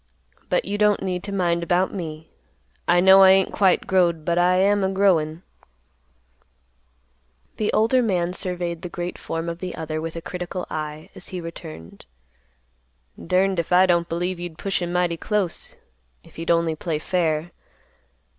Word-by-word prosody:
But - - +1
you 205 - -3
don't 210 -1 +3
need 180 -2 -2
to 200 - -5
mind 175 -3 0
about 180 +2 +1
me; 160 -4 -7 0.6
I 175 0 +4
know 190 +1 +8
I 190 - +8
ain't 190 0 +4
quite 190 -3 +3
growed, 170 -4 +2
but 170 0 +1
I 180 +1 +4
am 200 +2 +3
a 190 - +1
growin'." 180 -4 +1 2.1
The 215 - 0
older 230 +4 +3
man 180 -6 0
surveyed 175 -2 -3
the 180 - -6
great 175 -1 -5
form 165 +1 -4
of 170 0 -4
the 180 -1 -5
other 155 -1 -4
with 165 0 -5
a - - -3
critical 180 +3 -5
eye, 155 0 -5
as - - -8
he 185 - -5
returned, 80 - -10 1.2
"Durned 185 +1 +1
if 170 - -3
I 180 +1 +6
don't 170 -2 +1
believe 175 +2 -2
you'd 175 -2 -7
push 195 -2 -2
him 175 0 -3
mighty 175 -1 0
close, 200 -2 -2 0.5
if - - -18
he'd 165 +1 -5
only 165 -1 +2
play 160 0 -3
fair. 165 0 -1
175 Hz, 165 wpm, -23 LUFS, 165-190 Hz, 2.1 s, know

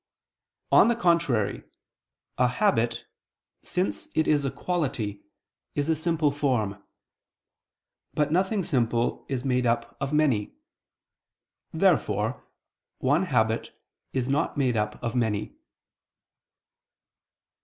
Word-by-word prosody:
On - - +7
the 235 - +3
contrary, 170 - +1 0.8
A 125 - +5
habit, 120 - +1 0.6
since 100 +2 -2
it 160 - +2
is 150 -2 +3
a - - +1
quality, 135 - -2 0.5
is 145 +2 -1
a 160 - +3
simple 160 -2 +1
form. 110 -9 -1 1.3
But 150 0 +1
nothing 190 +4 +1
simple 120 -7 0
is 130 -1 -3
made 125 -2 +1
up 115 0 -1
of 135 - -2
many. 140 -9 +1 1.2
Therefore - - +1 0.5
one 145 +8 +2
habit 115 -7 0 0.3
is 130 -2 -1
not 140 +2 0
made 130 -4 +1
up 105 -1 -1
of 120 +1 -2
many. 110 -4 -1
130 Hz, 105 wpm, -26 LUFS, 115-155 Hz, 1.3 s, On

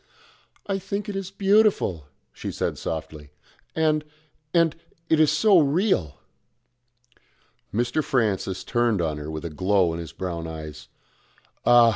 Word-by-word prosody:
"I 195 -1 -1
think 200 +3 -4
it 205 - -4
is 195 -1 -3
beautiful," 195 - +2 0.3
she - - -5
said - - -2
softly, 75 -2 -5 0.5
"and 155 -1 +2 0.5
and 165 -1 +3 0.3
it 160 - +4
is 155 -1 +5
so 185 +5 +5
real." 145 - +1 1.5
Mr. 120 +7 0
Francis 100 -7 0
turned 120 -4 +1
on 80 -3 -1
her 75 +1 -6
with 80 +1 -5
a 85 - -4
glow 95 +1 +2
in 85 - -4
his 80 -4 -7
brown 85 -2 -4
eyes. 75 -1 -8 0.8
"Ah! 120 -1 +8
115 Hz, 135 wpm, -25 LUFS, -, 1.5 s, Ah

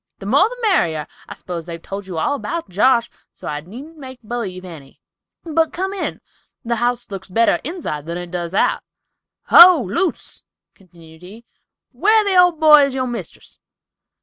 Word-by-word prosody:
The 195 - -11
more 280 - +3
the - - -9
merrier. 165 - +1 0.2
I - - -8
s'pose 170 -2 -7
they've 170 -1 -7
told 195 +3 -8
you 180 -3 -6
all 160 - 0
about 335 +4 -5
Josh, 235 +5 +2 0.3
so - - -11
I 150 0 -4
needn't 265 - -12
make 260 -2 -10
b'lieve 205 -5 -5
any—but 185 - -6
come 380 +2 -3
in—the 240 -10 -6
house 240 -2 -2
looks 195 0 -8
better 230 +5 +2
inside 260 - -6
than 170 +1 -4
it 175 -1 -8
does 175 0 -4
out." - - +1 0.7
"Ho, 350 -2 +9
Luce," 340 - -3 0.3
continued 165 -3 -19
he, 210 +6 -13 0.5
"where 425 - +3
the 400 -2 0
old 355 -3 +4
boy 305 -2 +7
is 275 -1 -5
your 260 -1 -1
mistress? 240 -2 -8
235 Hz, 165 wpm, -19 LUFS, -, 0.7 s, Ho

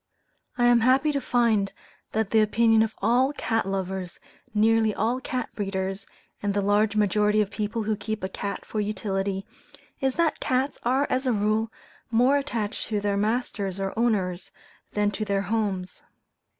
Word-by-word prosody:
I 240 - +3
am 240 -1 +6
happy 260 +6 +3
to 280 -1 -1
find 225 -6 +2 0.4
that 220 -2 0
the 225 - +5
opinion 225 +1 +4
of 220 -1 0
all 250 +6 +3
cat 225 -7 -1
lovers, 190 -2 -3 0.3
nearly 220 0 +3
all 235 +5 0
cat 255 -1 -3
breeders, 195 -1 -3 0.3
and 205 -1 -1
the 205 - +2
large 205 +2 +2
majority 210 +1 +3
of 205 -2 +1
people 215 +1 -2
who 215 0 0
keep 215 -1 -5
a - - 0
cat 200 +1 -5
for 215 - -4
utility, 195 -1 -2 0.5
is 265 -3 0
that 335 -2 +1
cats 260 +1 0
are 260 +4 +2
as 260 +1 0
a - - +3
rule 215 +2 +1 0.4
more 250 +5 +4
attached 230 -7 -3
to 210 -2 -1
their 205 0 0
masters 205 -3 -1
or 195 0 -2
owners 195 -6 0 0.4
than 205 0 +1
to 215 - -3
their 200 -2 0
homes. 195 -3 -2
215 Hz, 165 wpm, -26 LUFS, 200-235 Hz, 0.5 s, am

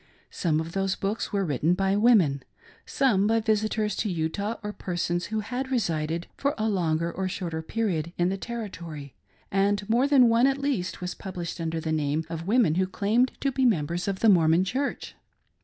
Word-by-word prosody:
Some 160 -3 0
of 160 +1 -4
those 195 +1 0
books 200 +3 -3
were 200 -2 0
written 155 +3 +1
by 195 +1 +1
women; 205 - +4 0.5
some 215 -8 +2
by 225 +1 +3
visitors 215 -1 0
to 215 - -1
Utah, 185 +6 -2
or 210 0 -4
persons 175 -2 -2
who 220 0 -2
had 255 +5 -4
resided 165 -9 -1
for 280 +1 -1
a 220 0 0
longer 170 -4 0
or 190 +2 -3
shorter 170 -4 -4
period 170 -4 -2
in 175 +1 +2
the 195 - -1 0.2
Territory; 170 - -6 0.4
and 200 +1 +1
more 240 +5 +3
than 270 -4 +6
one 230 +3 +4
at 275 0 +1
least 240 -13 -2
was 180 0 -3
published 175 -3 -6
under 165 0 -2
the 160 0 -3
name 155 0 0
of 165 +1 -5
women 215 -7 +3
who 185 - +1
claimed 220 +7 +1
to 275 - +1
be 265 0 0
members 175 - +1
of 195 -1 -2
the 225 - +5
Mormon 165 -2 +5
Church. 260 +9 -3
195 Hz, 190 wpm, -26 LUFS, 165-225 Hz, 0.5 s, than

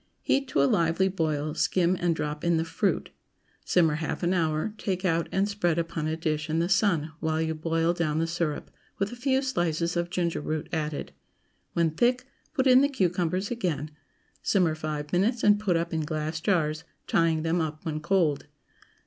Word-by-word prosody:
Heat 275 0 +1
to 140 - +2
a - - +5
lively 170 +5 +2
boil, 155 -4 -1
skim, 180 +2 +2
and 175 -2 +1
drop 150 -1 -4
in 170 -1 +2
the 160 - 0
fruit. 175 +5 -1 0.5
Simmer 165 -4 +3
half 160 +3 -3
an 175 +2 +2
hour, 160 +3 0
take 190 -1 -2
out 165 -2 +1
and 195 +1 +1
spread 175 -5 0
upon 165 -2 -2
a 160 +1 -2
dish 155 -1 -2
in 160 - 0
the 170 +2 +1
sun 185 -6 +2
while 160 0 0
you 160 0 0
boil 165 +1 0
down 165 -3 -1
the 165 - +1
syrup, 165 -3 -3 0.3
with 195 +1 -1
a - - -6
few 265 +2 +1
slices 175 - 0
of 175 0 -1
ginger 170 -3 -1
root 155 +1 -3
added. 150 - -3 0.6
When 170 -2 +2
thick, 245 +9 +1 0.3
put 260 -3 +2
in 255 0 +7
the 280 - +3
cucumbers 185 - 0
again; 160 - -2 0.5
simmer 180 -6 +2
five 155 -1 -5
minutes 220 +7 +1
and 205 0 +5
put 190 -5 +1
up 170 0 -2
in 160 - 0
glass 155 +1 -3
jars; 160 -4 +1 0.2
tying 165 -2 +2
them 165 +1 +1
up 155 +1 -4
when 155 -2 -2
cold. 155 -4 +1
165 Hz, 190 wpm, -27 LUFS, 155-190 Hz, 0.6 s, in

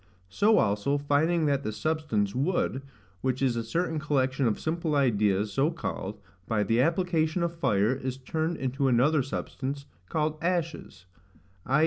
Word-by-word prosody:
So 215 - +3
also, 105 +7 +2
finding 155 +4 +2
that 140 -2 +1
the 110 - -3
substance, 115 -7 -1
wood, 135 -1 0 0.4
which 130 0 0
is 130 -3 +1
a 115 - -1
certain 160 +6 -1
collection 135 -3 +1
of 110 - 0
simple 160 -1 -1
ideas 105 -6 +2
so 140 +8 +2
called, 160 -10 -5 0.3
by 110 -2 +1
the 115 +3 +2
application 165 +1 +1
of 170 0 -1
fire, 115 -7 +2
is 130 -1 -4
turned 160 +5 -2
into 135 +1 -1
another 135 +5 +4
substance, 135 +1 -4 0.2
called 155 0 -1
ashes; 165 - -2 0.6
i. 135 +4 +3
140 Hz, 150 wpm, -28 LUFS, 120-160 Hz, 0.6 s, another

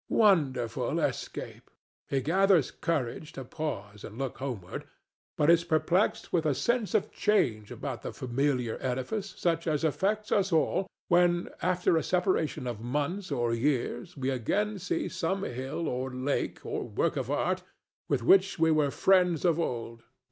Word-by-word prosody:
Wonderful 140 - +2
escape! - - -4 0.4
He 135 - +1
gathers 180 +1 +3
courage 150 -2 -2
to 135 - -7
pause 105 -9 -5
and 110 - -9
look 135 -2 -4
homeward, 120 -10 -5 0.5
but 150 +2 +5
is 170 0 +4
perplexed 170 +4 +1
with 170 -3 +3
a 145 - +2
sense 235 - 0
of - - +1
change 110 - +1
about - - -5
the - - -5
familiar 125 -1 -1
edifice 185 - -3
such 165 -1 0
as 150 -1 0
affects 205 +7 0
us 195 -1 +2
all 170 +4 +2 0.2
when, 175 0 +3
after 180 -2 +2
a 160 - +1
separation 180 -7 0
of 120 -3 -4
months 150 - -2
or 120 -1 0
years, 145 +7 -1
we 135 0 -1
again 200 - -1
see 180 - -2
some 190 +4 -2
hill 130 +3 -3
or 130 +1 -2
lake 130 +3 -2
or - - -3
work - - 0
of - - -3
art - - 0 0.5
with - - +1
which 195 +8 +5
we 165 0 +4
were 150 -2 +3
friends 180 +1 +3
of 170 -2 +3
old. 115 -6 -3
155 Hz, 155 wpm, -29 LUFS, 130-180 Hz, 0.5 s, but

